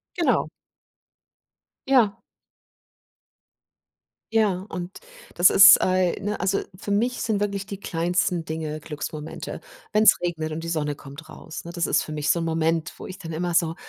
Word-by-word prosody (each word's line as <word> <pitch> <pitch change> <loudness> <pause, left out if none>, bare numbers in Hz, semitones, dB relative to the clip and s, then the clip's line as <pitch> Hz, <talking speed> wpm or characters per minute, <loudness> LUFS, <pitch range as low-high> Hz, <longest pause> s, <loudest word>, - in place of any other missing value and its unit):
Genau. 345 - +1 1.4
Ja. 240 -7 +3 2.2
Ja 200 -4 +1
und 180 0 -7 0.4
das 175 +1 +6
ist 200 +1 +9
ei 185 -1 +2
ne, 205 +1 -3
also, 190 +2 0 0.2
für 205 - -6
mich 240 +5 0
sind 215 -3 -1
wirklich 200 -1 -2
die 200 -1 -8
kleinsten 175 0 -1
Dinge 155 -1 -4
Glücksmomente. 150 0 -7 0.3
Wenn 215 0 +3
es 220 - +6
regnet 160 -3 -3
und 160 +1 -5
die 165 - -4
Sonne 150 -3 -1
kommt 140 +3 -12
raus, 160 +1 -10
ne? 170 - -8
Das 170 -1 -1
ist - - +2
für 155 - -6
mich 150 -1 -2
so 170 - +3
'n - - -2
Moment 165 0 0
wo - - -9
ich 185 - -8
dann 165 -2 -8
immer 175 +2 -2
so: 165 -1 +2
175 Hz, 165 wpm, -24 LUFS, 160-200 Hz, 2.2 s, ist